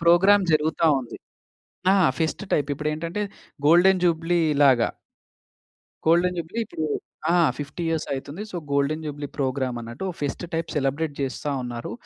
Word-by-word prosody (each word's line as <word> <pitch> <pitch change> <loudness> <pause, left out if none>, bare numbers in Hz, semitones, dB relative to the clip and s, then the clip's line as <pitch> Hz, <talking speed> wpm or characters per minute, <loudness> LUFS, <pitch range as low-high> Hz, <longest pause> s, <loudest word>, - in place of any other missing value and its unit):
Programme 190 +4 +5
జరుగుతా 155 +1 +2
ఉంది. 120 - -9 0.8
ఆ! - - +4 0.2
Fest 160 +5 -1
type. 145 -1 +1
ఇప్పుడేంటంటే 155 +6 -3 0.4
గోల్డెన్ 180 +3 +5
జూబ్లీలాగా. 160 -7 +3 1.2
గోల్డెన్ 175 +2 +3
జూబ్లీ 170 +8 -3
ఇప్పుడు 160 - -5 0.5
ఆ! - - +3 0.2
50 145 +4 -5
ఇయర్స్ 160 -1 -1
అయితుంది. 145 +7 -5
సో, 180 - -5 0.2
గోల్డెన్ 140 +3 +1
జూబ్లీ 145 -1 -5
ప్రోగ్రామ్ 130 -2 -1
అన్నట్టు 120 +11 -6
ఫెస్ట్ 145 +4 -3
టైప్ 165 0 -2
సెలబ్రేట్ 145 +2 0
చేస్తా 135 +2 -3
ఉన్నారు. 120 -3 -5
155 Hz, 130 wpm, -24 LUFS, 140-170 Hz, 1.2 s, ప్రోగ్రామ్